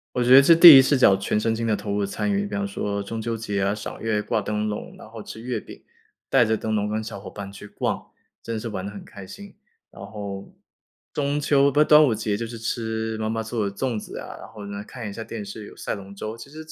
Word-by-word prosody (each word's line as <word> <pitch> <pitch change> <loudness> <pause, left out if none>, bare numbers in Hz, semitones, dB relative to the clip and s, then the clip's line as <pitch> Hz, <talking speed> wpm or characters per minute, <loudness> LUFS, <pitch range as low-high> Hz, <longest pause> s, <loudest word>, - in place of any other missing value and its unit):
我 125 - +1
觉 120 - +2
得 135 - +10
是 165 +4 +6
第 165 -2 +12
一 - - +9
次 130 - 0
视 - - +2
角 100 -6 +6
全 100 +2 -1
身 110 +1 0
心 115 +1 -2
地 110 - +2
投 105 - -5
入 100 0 0
参 100 - -2
与， 200 0 0
比 - - -5
方 200 0 -1
说 105 - -3
中 110 +3 -5
秋 115 0 -3
节 105 -3 -3
啊， 100 +2 +1
赏 105 - -8
月， 110 -2 0
挂 110 0 -1
灯 105 0 -2
笼， 105 -1 -5
然 - - -12
后 110 0 -10
吃 110 - -9
月 120 +2 -3
饼， - - -13 0.5
带 - - +5
着 110 -1 +1
灯 110 +1 -3
笼 105 0 0
跟 110 +1 -2
小 110 - -7
伙 100 - -9
伴 100 -1 -8
去 100 - -11
逛， - - -3 0.3
真 115 -1 -4
是 115 +1 -5
玩 95 -3 -5
得 100 - -5
很 100 - -10
开 100 -2 -11
心。 200 - -11 0.4
然 - - -11
后 100 -1 -7 0.6
中 145 0 -1
秋 140 -1 +3
不 145 - +1
是， 150 - +6
端 150 0 +7
午 125 -7 +2
节 105 -1 -1
就 115 +2 -4
是 115 +1 -8
吃 110 -1 -3
妈 110 0 -2
妈 110 0 -2
做 110 -2 -2
的 100 - -13
粽 120 -1 -2
子 - - -9
啊， - - -8
然 - - -10
后 105 -2 -10
呢， 100 0 -6
看 115 +1 -8
一 100 - -6
下 115 - -6
电 110 -2 -7
视， 105 +1 -8
有 - - -14
赛 - - -3
龙 100 0 -9
舟， 110 +2 -5
其 115 +4 -12
实 155 +2 -10
110 Hz, 300 characters per minute, -24 LUFS, 105-120 Hz, 0.6 s, 第